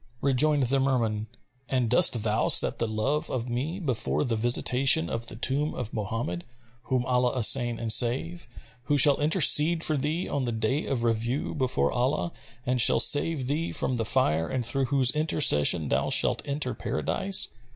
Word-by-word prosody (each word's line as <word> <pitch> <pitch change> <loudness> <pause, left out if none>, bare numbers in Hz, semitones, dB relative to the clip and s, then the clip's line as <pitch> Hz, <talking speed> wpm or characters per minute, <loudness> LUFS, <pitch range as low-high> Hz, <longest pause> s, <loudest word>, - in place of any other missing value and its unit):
Rejoined 140 +2 0
the 135 +2 0
Merman, 115 -5 -2 0.4
"And 130 -3 -1
dost 120 -1 +1
thou 110 0 -1
set - - +3
the 115 - -2
love 110 +8 -2
of 125 -2 -4
me 140 +10 -5
before 110 - -2
the 115 - -3
visitation 120 -4 +2
of 115 0 -5
the - - -6
tomb 140 +6 -2
of 120 -3 -7
Mohammed 105 -5 -5 0.4
(whom 130 -2 -2
Allah 125 0 -1
assain 120 0 +2
and 115 -1 +2
save!), 135 +9 0 0.4
who 145 +1 0
shall 140 +1 +4
intercede 160 +1 +4
for 155 - +2
thee 155 +6 -3
on 140 -2 -3
the 120 - -3
Day 115 +6 -3
of 125 -4 -3
Review 115 +4 -2
before 120 - -1
Allah 130 +7 -2 0.3
and 125 0 +1
shall - - +5
save 145 -2 +3
thee 150 +5 -3
from 130 - 0
the 115 - -2
Fire 80 -9 0
and 125 -2 -4
through 135 +3 -1
whose 130 -1 +2
intercession 90 - +2
thou - - -1
shalt - - +1
enter 140 -2 -4
Paradise? 190 - 0
125 Hz, 170 wpm, -25 LUFS, 115-145 Hz, 0.4 s, shall